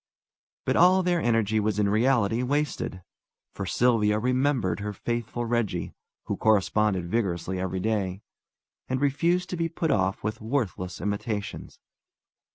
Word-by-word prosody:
But - - +1
all 185 +2 +5
their 175 -2 +1
energy 115 -3 +2
was 105 -1 0
in 105 -1 +2
reality 115 +1 +2
wasted, 135 -8 -2 0.5
for 95 - -5
Sylvia 110 -2 +3
remembered 125 -6 +1
her 105 0 -4
faithful 120 +2 -3
Reggie, 115 -7 -1 0.3
who - - -3
corresponded 105 -3 +2
vigorously 95 -4 -1
every 95 0 -2
day, 100 -2 -1 0.7
and 130 0 0
refused 170 +6 +1
to 180 - -2
be 165 0 0
put 165 -1 -1
off 95 +1 0
with 110 +2 -3
worthless 110 -7 -2
imitations. 105 +1 -4
110 Hz, 135 wpm, -26 LUFS, 100-130 Hz, 0.7 s, all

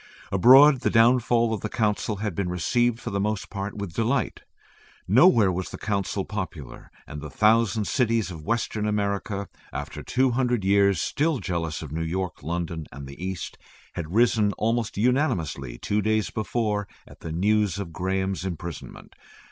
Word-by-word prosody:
Abroad 130 +8 +7
the - - 0
downfall 120 0 +3
of 110 - -3
the 105 - -3
Council 105 -1 0
had 100 -1 -3
been 90 +1 -2
received 120 +7 +1
for - - -6
the 100 - -1
most 105 +1 -2
part 100 0 -5
with 100 -5 -5
delight. 115 +4 -1 0.7
Nowhere 115 - +5
was 90 +1 -3
the - - -8
Council 100 -2 -2
popular, 90 - -7 0.2
and 75 - -8
the 75 - -7
thousand 110 - +2
cities 115 -6 +1
of 80 -3 -9
Western 110 0 -1
America, 100 -1 -2 0.2
after - - -6
two 130 0 +1
hundred 120 -4 0
years 100 -2 +4
still 155 - 0
jealous 85 -6 -3
of 75 - -8
New 80 +2 -3
York, 90 +2 -3
London, 80 0 -4
and 70 -1 -9
the 70 +6 -10
East, 95 -2 -5 0.3
had 80 -2 -5
risen 110 -1 +3
almost 115 -1 -1
unanimously 90 - 0
two 105 +9 -1
days 110 0 0
before 105 -2 -1 0.2
at - - -15
the 80 - -7
news 100 +2 +1
of 95 -5 -6
Graham's 95 +2 -2
imprisonment. 85 -3 -7
100 Hz, 165 wpm, -25 LUFS, 90-115 Hz, 0.7 s, Abroad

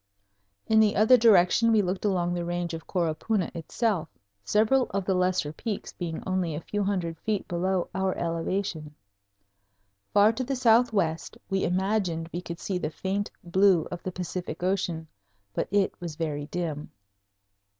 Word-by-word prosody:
In 220 0 +4
the 215 -1 +4
other 220 +5 +6
direction 225 -1 +5
we 215 -2 +4
looked 185 +2 -2
along 175 -3 +1
the 175 -1 -2
range 175 0 -3
of 165 -1 -7
Coropuna 180 +3 -1
itself; 170 0 -1 0.3
several 225 - +3
of 195 -1 -2
the 190 - +1
lesser 180 -4 +1
peaks 210 +4 -5
being 165 -3 -5
only 185 -4 -1
a - - -3
few 205 +5 -3
hundred 175 -5 -2
feet 215 -3 -2
below 180 +1 0
our 190 0 -1
elevation. 165 -2 -2 1.2
Far 205 +2 +5
to 255 - -2
the 270 +2 -2
southwest 225 -9 +2
we 195 0 +1
imagined 180 -3 0
we 175 - -3
could 170 -1 -7
see 185 -2 -2
the 155 - -2
faint 195 +5 -2
blue 180 -1 +3
of 175 - -5
the 185 - -4
Pacific 180 0 -5
Ocean, 180 -4 -1 0.5
but - - -1
it 200 0 +2
was 170 -3 -5
very 150 -2 -3
dim. 160 -3 -4
185 Hz, 160 wpm, -27 LUFS, 170-205 Hz, 1.2 s, other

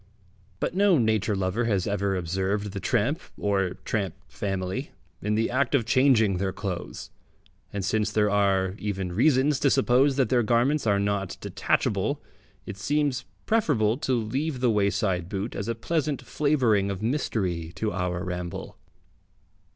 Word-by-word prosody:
But - - -1
no 195 -2 +4
nature 110 -3 +1
lover 95 +5 0
has 100 -5 +1
ever 100 -1 0
observed 95 +4 -1
the 100 - -5
tramp 140 - 0 0.2
or 95 -3 0
tramp 95 -6 -1
family 95 -2 -3 0.3
in 105 +1 0
the 115 +1 +1
act 130 +2 +1
of 120 -5 +2
changing 120 -6 +4
their 95 +1 -1
clothes, 95 -3 -5 0.6
and 100 -2 -3
since 110 +1 0
there 105 -1 +2
are 95 -2 +2
even 95 -3 -3
reasons 135 - +3
to 140 - +3
suppose 135 +1 +3
that 130 -5 +2
their 125 -2 +3
garments 120 +5 +2
are 100 -1 +3
not 100 -1 -1
detachable, - - 0 0.5
it - - -7
seems 145 +3 0 0.2
preferable 135 - +2
to 130 -2 -1
leave 130 +6 -2
the 125 -2 +3
wayside 100 -4 0
boot 100 +3 -3
as 100 - -4
a 115 - -1
pleasant 145 +4 -1
flavouring 125 -10 +2
of 100 +1 -4
mystery 95 - -1
to 110 +3 -1
our 90 0 -2
ramble. 90 -2 -5
105 Hz, 150 wpm, -26 LUFS, 95-130 Hz, 0.6 s, no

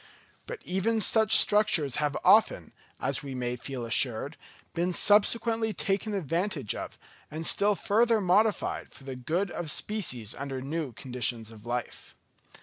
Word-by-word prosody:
But - - -8
even 190 +5 -1
such 220 +2 +5
structures 205 - +2
have 150 -1 -1
often, - - +3 0.3
as 135 0 -1
we 135 -2 -7
may 125 -1 -3
feel 125 0 -6
assured, 120 +5 0 0.4
been 175 +1 -1
subsequently 220 +3 +2
taken 205 +2 -1
advantage 170 - -2
of, - - -7 0.3
and 155 +2 -5
still 205 +4 +3
further 225 +3 +2
modified, 205 +3 +1
for - - -15
the 135 -1 -7
good 170 +9 -2
of 170 -3 -4
species 130 - -1
under 135 -1 -5
new 145 +1 -4
conditions 120 -2 -4
of 110 0 -14
life. 120 0 -5
165 Hz, 145 wpm, -28 LUFS, 130-205 Hz, 0.4 s, such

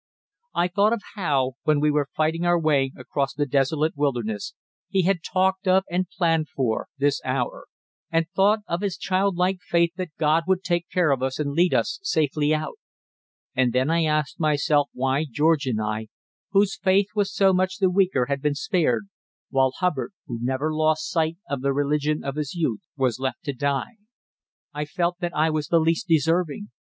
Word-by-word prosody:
I 175 - +2
thought 200 +5 +2
of 235 - -2
how, 140 - 0
when 155 -1 +2
we 150 +1 +3
were 145 -1 0
fighting 160 +2 0
our 175 0 +3
way 140 -4 +2
across 135 +2 -2
the 145 0 0
desolate 145 +4 +1
wilderness, 120 -8 -2 0.3
he 190 -1 +2
had 190 0 +2
talked 190 +3 0
of, 190 +1 +4
and 180 +1 0
planned 165 -4 0
for, 120 -5 -1
this 145 0 +1
hour; 130 -1 -2 0.4
and 165 0 +1
thought 205 +3 +4
of 170 +2 -2
his 200 -4 -2
childlike 185 -1 0
faith 170 -1 +1
that 185 -2 -3
God 160 +1 +2
would 190 0 +1
take 175 -1 -1
care 175 -5 +2
of 135 -2 0
us 130 0 -1
and 145 -2 -2
lead 170 +5 +2
us - - 0
safely 150 - +1
out. 155 0 -2 0.8
And 125 -2 +2
then 130 +4 +2
I 165 0 +2
asked 150 -1 -1
myself 150 -2 +2
why 135 +3 0
George 150 +1 +2
and 115 -4 0
I, 110 +1 -3 0.4
whose 200 -1 +2
faith 195 +1 +2
was 205 -2 0
so 195 -1 +3
much 185 +3 0
the 190 -4 +2
weaker, 180 -9 +2
had 140 +1 -2
been 150 0 0
spared, 145 - +1 0.5
while 135 -1 +2
Hubbard, 165 -3 -1
who 120 -7 -5
never 130 +5 -1
lost 155 0 +1
sight 165 0 0
of 140 -1 -3
the 140 0 +1
religion 150 +2 0
of 140 +1 -4
his 150 +1 -3
youth, 155 -11 -1 0.2
was 130 -3 0
left 130 -2 -3
to 140 - -3
die. 140 - -2 0.8
I 150 +1 -3
felt 175 +4 -1
that 175 -2 -3
I 155 +1 +2
was 155 -1 -2
the 170 - +3
least 165 +2 +1
deserving. 165 +4 +1
155 Hz, 185 wpm, -24 LUFS, 140-180 Hz, 0.8 s, of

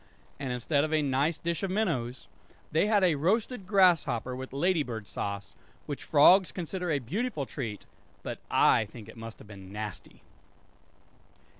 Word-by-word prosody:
And 135 -3 -3
instead 140 +4 +1
of 155 - -2
a 155 -1 +2
nice 140 +4 +1
dish 170 -1 -2
of 195 - -1
minnows 160 - -1 0.5
they 160 +6 +3
had 210 -2 +3
a 180 -3 +5
roasted 200 - 0
grasshopper 170 - +3
with 130 +1 -7
lady 165 +5 +2
bird 115 -7 -5
sauce; 100 0 -5 0.3
which 145 - -5
frogs 180 +5 +6
consider 180 0 -4
a 150 - +2
beautiful 150 - -2
treat; 115 -7 -6 0.4
but - - -5
I 110 - +4
think 105 0 -12
it 115 - -12
must 115 -1 -9
have - - -14
been 95 -2 -11
nasty! 105 -2 -7
145 Hz, 160 wpm, -29 LUFS, 115-180 Hz, 0.5 s, frogs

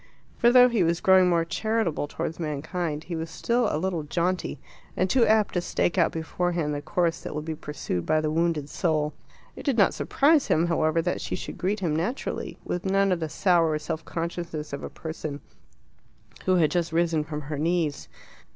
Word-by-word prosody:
For 235 - +4
though 250 0 +8
he 235 -5 +1
was 170 0 +2
growing 190 -1 +5
more 170 -1 +2
charitable 215 -5 -1
towards 160 +2 -4
mankind, 155 +1 -3
he 175 - -5
was 160 0 -4
still 235 +6 0
a - - -1
little 175 0 -1
jaunty, 170 0 -1 0.4
and 185 - +2
too 230 +3 +3
apt 215 -1 +3
to 175 - +1
stake 175 0 0
out 170 - +3
beforehand 165 -1 -1
the 145 - -3
course 170 +1 0
that - - -6
will 150 - -3
be 160 0 -3
pursued 150 - -4
by 155 - +2
the 155 0 -1
wounded 165 -2 0
soul. 155 -2 0 0.4
It - - -8
did 275 -6 0
not 200 - +5
surprise 295 +1 +3
him, 160 +2 +3
however, 165 -1 +1
that 180 - -1
she - - -3
should - - -7
greet 195 +3 -1
him 160 -5 0
naturally, 185 - -3
with 180 - -3
none 195 0 +2
of 180 - +1
the 160 -1 -3
sour 165 -3 +2
self 155 +1 -4
consciousness 165 -3 -4
of 140 - -4
a - - -5
person 155 -3 -6 1.1
who 185 - +3
had 160 -4 +3
just 170 -2 0
risen 165 -2 +1
from 150 0 -5
her 145 0 -5
knees. 165 -2 0
170 Hz, 195 wpm, -26 LUFS, 155-185 Hz, 1.1 s, though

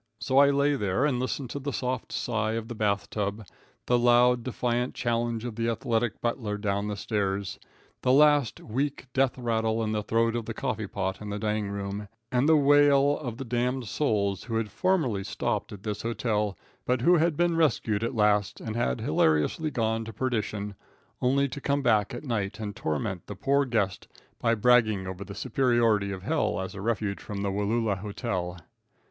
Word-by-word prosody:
So 130 +1 +2
I 140 0 +7
lay 140 +1 +2
there 105 +3 0
and 130 -5 +1
listened 130 0 -3
to 140 - -4
the 140 +1 -3
soft 125 -2 -3
sigh 110 -2 -1
of 115 0 -3
the - - -4
bath 105 -2 0
tub, 105 +1 -3 0.4
the 125 0 +3
loud, 120 0 +4
defiant 125 0 -1
challenge 120 -1 -1
of 120 -3 -5
the 115 +1 0
athletic 115 0 -1
butler 115 -3 -2
down 100 0 -1
stairs, 100 -2 -2 0.4
the 125 - +2
last 145 -2 +4
weak 135 +5 -2
death 135 -1 +2
rattle 115 -2 0
in 110 - -1
the 105 -1 0
throat 115 +2 +1
of 120 -2 -2
the 115 - -4
coffee 110 -5 -2
pot 95 0 -3
in 105 - -6
the 105 - -3
dining 105 -1 -1
room, 100 +1 -4 0.2
and 125 +4 +2
the 160 - +6
wail 145 0 +5
of 120 -5 -5
the 135 - -5
damned 125 +2 -1
souls 100 -7 0
who 115 - -3
had 110 -2 -1
formerly 130 - +1
stopped - - -2
at 100 -1 -10
this 105 -1 -3
hotel, 105 -4 -1 0.3
but 125 -1 0
who 175 +7 +5
had 160 -1 +2
been 175 -1 +2
rescued 115 -9 +1
at 115 - -2
last, 105 -2 +2
and 110 -1 -5
had 65 - 0
hilariously 80 - +2
gone 115 -4 -1
to 110 - -7
perdition, 110 -4 -2 0.5
only 135 +2 +3
to 140 +1 -7
come 140 0 0
back 110 -4 +3
at 120 - -6
night 115 -7 -2
and 105 -2 -5
torment 85 +4 -3
the 105 - -6
poor 140 +7 +2
guest 110 -7 -1 0.3
by 115 -1 +2
bragging 110 -4 +3
over 95 +1 -5
the 100 0 -9
superiority 115 -7 +2
of 95 -1 -6
hell 85 - 0
as 95 0 -4
a 100 - -7
refuge 105 -2 -1
from 100 -1 -5
the 100 - 0
Wallula 105 0 0
hotel. 95 -4 -3
115 Hz, 190 wpm, -27 LUFS, 105-125 Hz, 0.5 s, I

